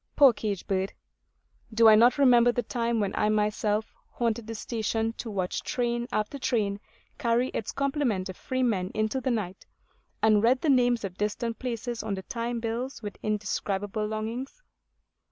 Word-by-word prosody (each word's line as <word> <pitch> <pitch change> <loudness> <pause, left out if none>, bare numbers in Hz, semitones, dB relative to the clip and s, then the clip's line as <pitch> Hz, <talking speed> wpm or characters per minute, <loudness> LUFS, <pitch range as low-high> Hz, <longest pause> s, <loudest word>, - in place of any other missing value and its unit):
Poor 275 -4 +7
cage 205 -4 -3
bird! 190 0 -1 0.8
Do 225 +1 +5
I 220 - +9
not 235 +5 +6
remember 245 -3 +6
the 245 0 -1
time 235 -2 -1
when 200 -2 -1
I 210 - +1
myself 210 0 0 0.2
haunted 230 -1 -2
the 225 - -5
station, 225 0 -2
to 235 - -4
watch 190 -3 -2
train 240 -1 -1
after 215 +7 -2
train 205 -6 0 0.4
carry 240 -1 +2
its 225 - -4
complement 275 -9 0
of 185 - -7
freemen 230 -8 -1
into 215 +5 0
the 260 - -1
night, 200 -6 -2 0.6
and 215 -2 +4
read 250 +3 +3
the 315 - +1
names 245 -3 +3
of 190 -2 -6
distant 220 +3 -2
places 240 -1 -3
on 200 - -2
the 190 - -7
time 235 +2 -3
bills 230 +2 -4
with 205 -1 -6
indescribable 210 0 -2
longings? 230 - -5
225 Hz, 165 wpm, -27 LUFS, 210-245 Hz, 0.8 s, I